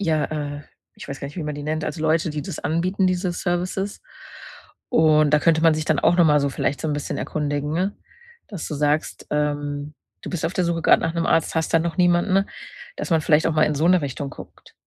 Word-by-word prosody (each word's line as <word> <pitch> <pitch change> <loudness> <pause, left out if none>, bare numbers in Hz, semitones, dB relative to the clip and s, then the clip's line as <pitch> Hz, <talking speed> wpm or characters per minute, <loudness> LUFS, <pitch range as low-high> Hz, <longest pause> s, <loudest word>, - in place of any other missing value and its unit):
ja, 155 -6 +1
äh. 145 -1 -5 0.4
Ich - - -9
weiß 140 -1 -6
gar 140 - -5
nicht, 145 - -11
wie 170 - -3
man 150 0 -3
die 145 - -7
nennt 155 +1 -2
also, 150 +1 -4
Leute, 160 +1 +1
die 150 0 -4
das 145 - -6
anbieten, 185 +5 0
diese 185 0 0
Services. 180 +3 -2 0.9
Und 155 - +4
da 150 - +6
könnte 160 +1 +2
man 165 -1 +5
sich 155 0 -3
dann 155 -2 +2
auch 165 +2 +3
noch 175 - +6
mal 150 -1 +4
so 140 0 0
vielleicht 140 +1 -2
so - - -2
'n 150 - 0
bisschen 145 -1 -3
erkundigen, 145 -1 -2
ne? 185 +5 -1 0.5
Dass 195 -8 -6
du - - -5
sagst, 150 +1 -1
ähm, 145 0 -2 0.3
du - - -5
bist 175 -4 -3
auf 165 - -2
der 185 - 0
Suche 170 -1 -1
grade - - +5
nach 165 - -1
'nem 170 -1 -1
Arzt, 165 - +2
hast 160 0 0
da - - +7
noch 165 +1 -3
niemanden, 180 +2 +3 0.5
dass - - -5
man 165 -1 +3
vielleicht 150 +1 +3
auch 165 - 0
mal 155 - +2
in 150 - +1
so 155 +4 +2
'ne 180 -1 +4
Richtung 140 0 -4
guckt. - - -13
155 Hz, 240 wpm, -22 LUFS, 150-175 Hz, 0.9 s, da